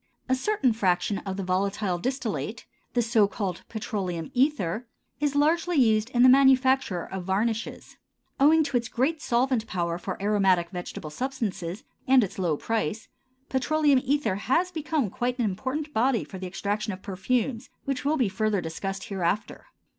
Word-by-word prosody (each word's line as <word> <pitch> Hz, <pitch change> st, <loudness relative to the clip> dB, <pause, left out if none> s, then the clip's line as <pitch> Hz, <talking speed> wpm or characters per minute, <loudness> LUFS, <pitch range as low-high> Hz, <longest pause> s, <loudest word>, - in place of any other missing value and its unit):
A 260 Hz, -, +2 dB
certain 265 Hz, -, +1 dB
fraction 195 Hz, -1 st, +1 dB
of 190 Hz, 0 st, -3 dB
the 195 Hz, -, -2 dB
volatile 190 Hz, 0 st, 0 dB
distillate, 235 Hz, -2 st, -3 dB, 0.3 s
the 240 Hz, -, +3 dB
so 225 Hz, -3 st, +3 dB
called 195 Hz, -4 st, -4 dB
petroleum 190 Hz, -7 st, -4 dB
ether, 245 Hz, -, +1 dB, 0.3 s
is 290 Hz, -1 st, 0 dB
largely 330 Hz, +4 st, +2 dB
used 220 Hz, -3 st, +3 dB
in 245 Hz, -1 st, +3 dB
the -, -, +9 dB
manufacture 260 Hz, -7 st, +4 dB
of 190 Hz, -2 st, -6 dB
varnishes. 220 Hz, +4 st, -2 dB, 0.4 s
Owing 310 Hz, +3 st, +6 dB
to 280 Hz, -4 st, 0 dB
its 235 Hz, -1 st, -3 dB
great 285 Hz, +7 st, 0 dB
solvent 240 Hz, -2 st, +1 dB
power 170 Hz, -3 st, -2 dB
for -, -, -5 dB
aromatic 195 Hz, -4 st, +2 dB
vegetable 175 Hz, -4 st, -6 dB
substances 215 Hz, -, -3 dB, 0.2 s
and 260 Hz, -2 st, +6 dB
its 195 Hz, -, -5 dB
low 170 Hz, -5 st, +1 dB
price, 220 Hz, 0 st, -2 dB, 0.4 s
petroleum 285 Hz, 0 st, +2 dB
ether 270 Hz, -8 st, +1 dB
has 335 Hz, -, +1 dB
become 305 Hz, -, -1 dB
quite 245 Hz, +1 st, -2 dB
an 240 Hz, -, +1 dB
important 260 Hz, +10 st, -3 dB
body 235 Hz, +1 st, +2 dB
for 190 Hz, -, -9 dB
the 185 Hz, -, -5 dB
extraction 205 Hz, +3 st, -2 dB
of 185 Hz, 0 st, -8 dB
perfumes, 225 Hz, +5 st, -1 dB, 0.2 s
which 275 Hz, -2 st, -2 dB
will 300 Hz, +3 st, +1 dB
be 250 Hz, -6 st, +2 dB
further 215 Hz, 0 st, 0 dB
discussed 195 Hz, +4 st, -4 dB
hereafter. 195 Hz, 0 st, -2 dB
225 Hz, 160 wpm, -26 LUFS, 190-265 Hz, 0.4 s, the